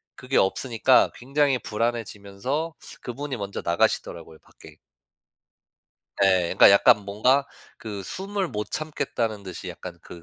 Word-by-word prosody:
그게 130 +1 -2
없으니까 120 +5 +3
굉장히 135 0 +1
불안해지면서 115 +6 -3 0.3
그분이 135 +1 -5
먼저 100 -1 -5
나가시더라고요 85 -1 -1
밖에. - - -17 1.5
예. 95 -1 +4
그러니까 - - +8
약간 100 +1 +5
뭔가 125 +8 +2 0.3
그 105 -3 -6
숨을 195 - -3
못 105 0 -5
참겠다는 120 -9 -3
듯이 95 0 -8
약간 85 0 -9
그 85 - -12
110 Hz, 300 characters per minute, -24 LUFS, 100-135 Hz, 1.5 s, 그러니까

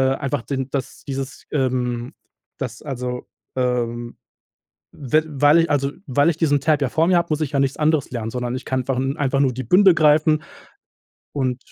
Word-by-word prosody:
einfach 135 -4 -3
den, 135 -1 -3
dass 135 -3 -4
dieses, 135 -1 -5
ähm, 125 -2 -1 0.4
dass 120 -3 -5
also 125 -3 -5 0.3
ähm, 120 -2 -2 0.7
we 155 +2 0
weil 145 +2 +4
ich 165 - +2
also 140 -1 +1 0.2
weil 145 +5 +3
ich 160 - -7
diesen 145 -4 +2
Tab 150 -1 +2
ja 130 - +1
vor 160 +1 +2
mir 180 -1 +4
habe, 170 - +1
muss 155 +1 0
ich 150 - -1
ja 140 - +2
nichts 135 0 0
anderes 155 -2 +1
lernen, 115 -2 -4
sondern 125 0 -3
ich 130 - -6
kann 130 -1 -1
ver 135 -2 -1 0.2
einfach 135 -1 0
nur 130 -3 +2
die 130 +2 -5
Bündel 185 - +6
greifen 155 0 +4 0.9
und 130 -3 -1
135 Hz, 185 wpm, -21 LUFS, 125-150 Hz, 0.9 s, Bündel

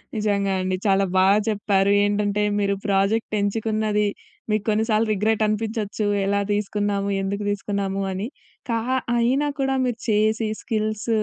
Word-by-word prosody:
నిజంగా 200 -2 0
అండి. 185 0 -1
చాలా 195 -1 +3
బాగా 195 +2 +5
చెప్పారు. 200 -2 +2
ఏంటంటే 205 0 +1 0.2
మీరు 200 -1 +1
ప్రాజెక్ట్ 200 +3 +1
ఎంచుకున్నది, 215 0 0 0.4
మీకు 215 -1 +1
కొన్నిసార్లు 220 +1 +2
రిగ్రెట్ 215 +2 +1
అనిపించొచ్చు. 215 -1 -2 0.2
ఎలా 200 +1 +1
తీసుకున్నాము, 205 -1 -1
ఎందుకు 200 +2 -2
తీసుకున్నాము, 200 -1 -2
అని 190 +4 -3 0.4
కా 230 -1 +1 0.4
అయినా 260 +5 +2
కూడా 270 0 +1
మీరు 245 -2 -2
చేసి 215 +1 +2
స్కిల్స్ 215 0 -2
210 Hz, 130 wpm, -23 LUFS, 200-220 Hz, 0.4 s, బాగా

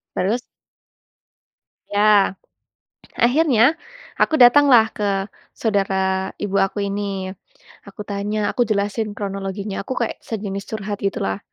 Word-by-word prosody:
Terus 210 +7 0 1.5
Ya. 205 -1 +3 0.8
Akhirnya, 260 +1 +4 0.4
aku 315 - +2
datanglah 245 -2 +7
ke 200 -2 -1 0.3
saudara 190 -3 0
ibu 200 -1 -4
aku 195 +2 -1
ini. 195 -1 -4 0.5
Aku 210 - -8
tanya 205 +1 -2
aku 245 - +1
jelasin 210 +1 -1
kronologinya, 195 0 -4
aku 260 - -5
kayak 235 - -1
sejenis 200 -3 -5
curhat 205 -1 -4
gitulah, 95 - -1
205 Hz, 105 wpm, -21 LUFS, 195-220 Hz, 1.5 s, datanglah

